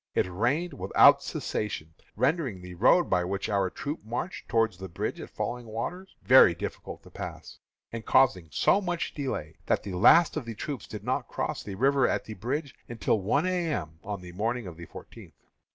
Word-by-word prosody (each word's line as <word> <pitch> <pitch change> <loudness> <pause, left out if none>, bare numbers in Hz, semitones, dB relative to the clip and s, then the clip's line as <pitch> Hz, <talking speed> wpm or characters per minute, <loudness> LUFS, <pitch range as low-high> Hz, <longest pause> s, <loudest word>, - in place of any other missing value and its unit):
It - - +3
rained 125 - 0
without 95 +1 +5
cessation, 80 -7 -4 0.2
rendering 130 - 0
the 90 0 -8
road 125 - +4
by 90 -1 +2
which, 95 +2 -3
our 100 -2 +1
troops 145 - -5
marched 120 - -5
toward 115 -3 +2
the 95 +2 -8
bridge 85 - -4
at - - -8
Falling 120 -1 -4
Waters 175 - -5
very 125 -9 +7
difficult - - -7
to - - -16
pass, - - -8 0.3
and 115 -1 -5
causing 115 -12 +3
so 195 - +3
much 175 -3 -2
delay 130 - -4
that - - +1
the 100 - -6
last 155 - +6
of 145 - -3
the 115 -1 -6
troops 135 +1 -5
did - - -8
not - - -1
cross - - -3
the 100 - -7
river 135 +4 +3
at - - -1
the 110 - -7 0.5
until 110 -3 0
one 125 - +1
A. 180 -3 0
M. 80 - -4
on 100 -2 -5
the 90 -1 -10
morning 115 +5 -2
of 90 -3 -8
the 85 0 -10
fourteenth. - - -12
110 Hz, 190 wpm, -28 LUFS, 95-140 Hz, 0.5 s, very